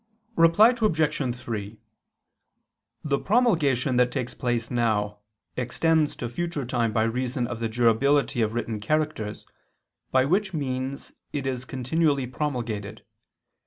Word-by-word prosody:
Reply 165 +7 +6
Obj. 155 - +1
3: 110 -3 -5 1.3
The 140 -2 0
promulgation 155 - +2
that 125 0 +3
takes 125 -2 -3
place 120 -2 -2
now, 105 -4 0 0.4
extends 155 +5 +1
to 120 - -4
future 150 +2 -3
time 120 -2 0
by 110 0 +2
reason 125 +2 -1
of 120 -1 -5
the 115 -1 -1
durability 120 +4 +2
of 110 +1 0
written 115 -2 -2
characters, 130 -3 -2 0.6
by 130 0 +3
which 190 +4 +1
means 130 -1 -4 0.2
it 140 -2 -2
is 130 -1 -3
continually 140 +2 0
promulgated. 120 -7 -4
130 Hz, 125 wpm, -26 LUFS, 115-150 Hz, 1.3 s, Reply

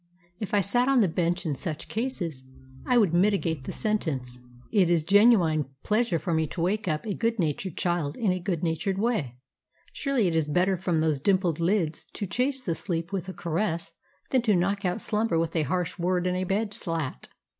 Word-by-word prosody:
If 210 -1 -2
I 205 - +4
sat 245 +6 +2
on 270 -3 +4
the 200 - +4
bench 175 +2 -1
in 155 - 0
such 155 +2 -5
cases 190 - -3 0.4
I 250 - +4
would 200 -8 +4
mitigate 175 -6 +1
the - - -4
sentence. 140 - -2 0.3
It 190 -5 +4
is 170 -3 +3
a - - -21
genuine 195 - +5 0.2
pleasure 215 -4 +1
for 165 +2 -2
me 160 -1 +1
to 175 - -8
wake 205 +4 0
up 155 +2 -1
a 210 - -1
good 230 +3 0
natured 165 0 -2
child 175 -6 -1
in 215 -5 +1
a 185 - -1
good 175 -3 -2
natured 170 +4 -1
way. 195 - -1 0.6
Surely 270 -8 +1
it 165 - 0
is 160 -2 +1
better 180 +5 +2
from 175 -3 0
those 155 -3 +1
dimpled 180 -1 +1
lids 170 -3 0
to 205 - -3
chase 255 +6 -1
the 170 - -1
sleep 170 +1 -3
with 190 -1 -3
a - - -5
caress 170 0 -2 0.4
than 260 - +4
to 220 -4 +3
knock 195 +3 0
out 180 +4 -1
slumber 215 -5 0
with 165 +1 -1
a 160 - +3
harsh 180 -1 -1
word 180 +1 +1
and 180 0 +1
a 185 0 -1
bed 205 +3 -1
slat. 165 - -4
180 Hz, 210 wpm, -27 LUFS, 165-210 Hz, 0.6 s, genuine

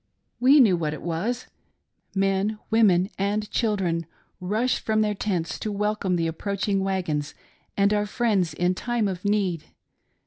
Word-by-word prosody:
We 265 +4 +6
knew 215 -9 +6
what 155 -3 -2
it - - -11
was! 200 +10 -2 0.7
Men, 195 +2 +1
women, 200 -4 +4
and 205 +2 0
children 185 -8 0 0.3
rushed 215 +7 0
from 215 0 +1
their 210 -1 +1
tents 185 -5 -2
to 215 - -3
welcome 205 -2 0
the 165 -1 0
approaching 200 +4 -1
wagons 175 -7 -2 0.4
and 200 +1 +3
our 210 0 +1
friends 205 -6 0
in 180 +1 +1
time 235 +2 -1
of 185 -2 -4
need. 195 -6 0
200 Hz, 145 wpm, -25 LUFS, 180-215 Hz, 0.7 s, We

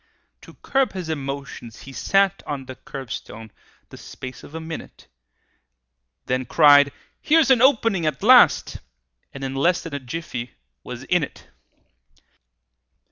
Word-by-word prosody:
To - - -15
curb 270 -1 +1
his 180 -4 -6
emotions, 135 -5 -6
he 135 - -11
sat 195 +5 +1
On 140 -2 -4
the 130 0 -9
curbstone 115 -4 -8 0.4
the - - -12
space 130 -1 -10
of 155 - -12
a - - -4
minute, 160 0 -9 1.2
Then 130 0 -1
cried, 145 +1 +6 0.3
"Here's 310 -3 +4
an 250 -3 +5
opening 230 - +3
at 155 - -3
last!" 250 +2 +5 0.5
And 135 - -9
in 135 0 -3
less 170 +6 +1
than 165 - -8
a 140 - -3
jiffy 125 -3 -6 0.3
was 125 0 -8
in 180 +5 +1
it! 140 - -8
145 Hz, 135 wpm, -22 LUFS, 130-190 Hz, 1.2 s, cried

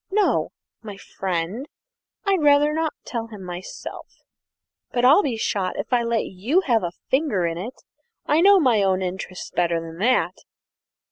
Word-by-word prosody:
No, 415 +1 +2 0.3
my 210 -3 -8
friend; 190 - -4 0.6
I'd 390 -4 +2
rather 295 0 +4
not 320 0 -1
tell 230 -2 -4
him 210 -4 -10
myself 180 0 -8 0.8
but 245 0 +1
I'll 290 +10 +7
be 255 - -2
shot 195 -4 -1
if - - -4
I 245 - +4
let 235 -1 0
you 230 - 0
have 235 - +2
a 175 -1 -3 0.2
finger 260 - +1
in 165 0 -2
it. 235 +8 -8 0.4
I 305 +2 +3
know 395 +1 +7
my 245 - +3
own 190 -1 +1
interests 185 0 -5
better 170 -1 +1
than 165 0 -9
that!" 250 +5 +2
225 Hz, 160 wpm, -23 LUFS, 185-285 Hz, 0.8 s, I'll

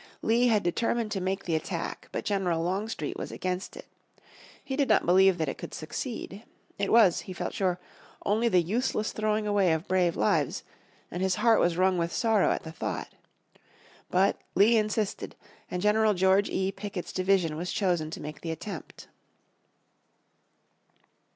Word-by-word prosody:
Lee 235 +2 +3
had 215 -4 +3
determined 230 +5 0
to 195 - -2
make 190 +2 -2
the 170 - -2
attack, 160 - -4
but - - -4
General 180 -5 0
Longstreet 190 -2 -3
was - - -5
against 185 0 -4
it. - - -10 0.8
He 265 - -3
did 280 -1 +1
not - - +4
believe 190 +1 +5
that 160 -2 -1
it - - -4
could - - -7
succeed. 200 - -5 0.4
It 200 - 0
was, 215 -7 +6
he 185 - -7
felt - - -4
sure, 180 -2 0 0.5
only 220 +4 +2
the 180 -4 +3
useless 215 +3 -1
throwing 215 0 -1
away 200 -4 +2
of 160 +4 -3
brave 180 -2 +2
lives, 105 - +1 0.5
and 175 - -4
his 190 -1 +1
heart 230 -2 +4
was 175 -1 +2
wrung 185 -1 +3
with 170 0 -1
sorrow 220 -3 +2
at - - -1
the 160 - -7
thought. 160 - -4 1.0
But 190 +2 +2
Lee 220 +4 +5
insisted, 215 -1 -1 0.3
and 180 +1 -3
General 210 0 +3
George 190 +2 +3
E. 190 0 -1
Pickett's 195 -2 -6
division 185 -4 +1
was 175 +3 -4
chosen 175 -6 0
to - - -7
make 150 +1 -8
the 165 - -5
attempt. 160 +1 -7
190 Hz, 165 wpm, -28 LUFS, 175-215 Hz, 1.0 s, was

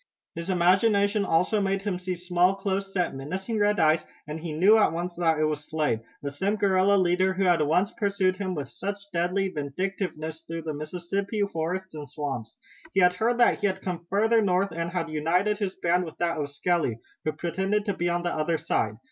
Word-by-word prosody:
His 170 +2 -6
imagination 200 +3 +3
also 180 +6 +2
made 195 0 0
him 195 -3 -2
see 180 0 -3
small, 180 +1 +2
close 195 0 -2
set, 180 -3 0
menacing 185 - -4
red 205 -1 +2
eyes, 155 0 +4 0.2
and 150 +1 -5
he 165 0 -5
knew 185 +8 +5
at 210 - +4
once 175 +2 -3
that 165 -2 +1
it 155 - +1
was 150 -1 -1
Slade, 150 -8 0 0.2
the 140 - -3
same 195 +9 0
guerrilla 200 -1 +3
leader 185 +1 +2
who 195 - 0
had 175 -3 +4
once 175 +7 +2
pursued 200 -4 0
him 185 -2 -3
with 145 -4 -4
such 200 +1 -6
deadly 180 +3 0
vindictiveness 160 +1 -4
through 165 0 -6
the 155 -1 -3
Mississippi 180 +7 -3
forest 185 0 -3
and 150 -3 -8
swamps. 130 -6 -5 0.4
He 195 - +3
had 180 0 +5
heard 230 +6 +1
that 240 - +4
he 205 - +2
had 190 -1 -3
come 170 -2 -4
farther 225 +3 +3
north 195 -1 +1
and 170 +1 -3
had 170 -2 -2
united 175 +7 +1
his 195 -3 -2
band 175 0 +1
with 160 - -10
that 170 -2 0
of 145 -1 -2
Skelly, 145 -4 0 0.3
who 155 - -1
pretended 190 +6 -1
to 200 - 0
be 175 -1 -1
on 175 0 -1
the 175 - -1
other 160 +1 0
side. 110 -7 -1
180 Hz, 205 wpm, -26 LUFS, 160-195 Hz, 0.4 s, knew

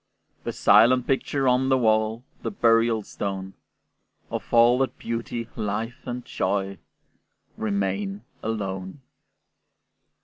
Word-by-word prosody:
The - - -1
silent 125 +1 +5
picture 135 0 0
on 130 +1 +3
the 130 - +4
wall, 110 0 +1 0.2
The - - -2
burial 115 - +3
stone, 95 -1 -5 0.8
Of - - -5
all 120 +2 +6
that 135 - -1
beauty, 115 0 -4
life, 110 +5 -4
and 125 0 -4
joy 100 -2 -2 0.8
Remain 100 -1 -2 0.2
alone! 100 +1 -4
115 Hz, 105 wpm, -25 LUFS, 100-120 Hz, 0.8 s, all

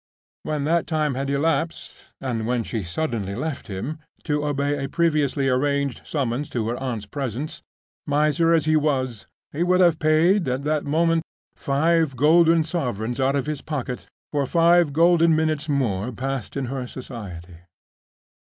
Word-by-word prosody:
When 150 -2 -2
that 165 +3 +1
time 155 -3 0
had 135 +2 -3
elapsed, 160 +3 -2
and 115 -4 -3
when 120 -1 0
she 110 -2 -3
suddenly 100 - -3
left 155 0 -4
him—to 150 +7 -4
obey 145 0 -1
a 135 - -3
previously 150 -4 +1
arranged 140 +1 0
summons 140 -1 -2
to 115 -3 -2
her 120 - -2
aunt's 125 -5 -4
presence—miser 150 +5 -2
as 165 -2 +3
he 155 0 +3
was, 130 -9 0 0.2
he 150 - -4
would 180 +1 +3
have 170 -3 +4
paid 160 +4 +3
at 130 +2 -1
that 150 0 0
moment 165 +3 +2 0.3
five 155 +1 +1
golden 165 +4 +5
sovereigns 125 - -3
out 135 +1 +2
of 140 - 0
his 150 -1 -3
pocket 130 -5 -4 0.2
for 145 -2 0
five 170 0 +4
golden 165 +1 +4
minutes 155 -1 0
more 120 -6 0
passed 135 +1 -4
in 135 - -1
her 130 0 -4
society. 95 -10 -9
145 Hz, 150 wpm, -23 LUFS, 125-160 Hz, 0.3 s, golden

